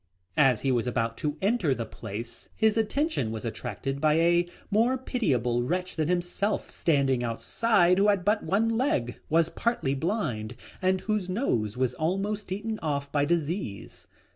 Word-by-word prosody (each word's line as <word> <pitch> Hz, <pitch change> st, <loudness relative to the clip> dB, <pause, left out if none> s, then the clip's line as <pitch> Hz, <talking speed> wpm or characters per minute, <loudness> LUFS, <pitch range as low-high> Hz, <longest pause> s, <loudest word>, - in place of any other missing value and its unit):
As 130 Hz, -6 st, +4 dB
he 135 Hz, -, +1 dB
was 120 Hz, -1 st, +1 dB
about 115 Hz, -2 st, -1 dB
to 150 Hz, +3 st, -2 dB
enter 195 Hz, -, +2 dB
the 115 Hz, -, -3 dB
place 110 Hz, +2 st, -7 dB
his 220 Hz, -1 st, +3 dB
attention 225 Hz, -, 0 dB
was 110 Hz, +1 st, -5 dB
attracted 125 Hz, +4 st, -4 dB
by 155 Hz, -1 st, +4 dB
a 170 Hz, +1 st, +3 dB, 0.2 s
more 235 Hz, +5 st, +3 dB
pitiable 130 Hz, -, 0 dB
wretch 180 Hz, +8 st, -2 dB
than 155 Hz, -2 st, 0 dB
himself 180 Hz, +4 st, -1 dB
standing 135 Hz, -6 st, +1 dB
outside 180 Hz, -, +2 dB
who 205 Hz, -, +4 dB
had 200 Hz, -3 st, +2 dB
but 210 Hz, +1 st, +3 dB
one 210 Hz, +4 st, +1 dB
leg, 120 Hz, -, 0 dB
was 165 Hz, +1 st, +3 dB
partly 230 Hz, -, 0 dB
blind, 135 Hz, -, -2 dB, 0.3 s
and 185 Hz, 0 st, +2 dB
whose 210 Hz, -4 st, -1 dB
nose 125 Hz, -, -1 dB
was 130 Hz, -1 st, +1 dB
almost 195 Hz, +7 st, -2 dB
eaten 215 Hz, +3 st, -3 dB
off 140 Hz, -2 st, -2 dB
by 145 Hz, -1 st, +2 dB
disease. 165 Hz, -, -3 dB
165 Hz, 160 wpm, -27 LUFS, 125-205 Hz, 0.3 s, As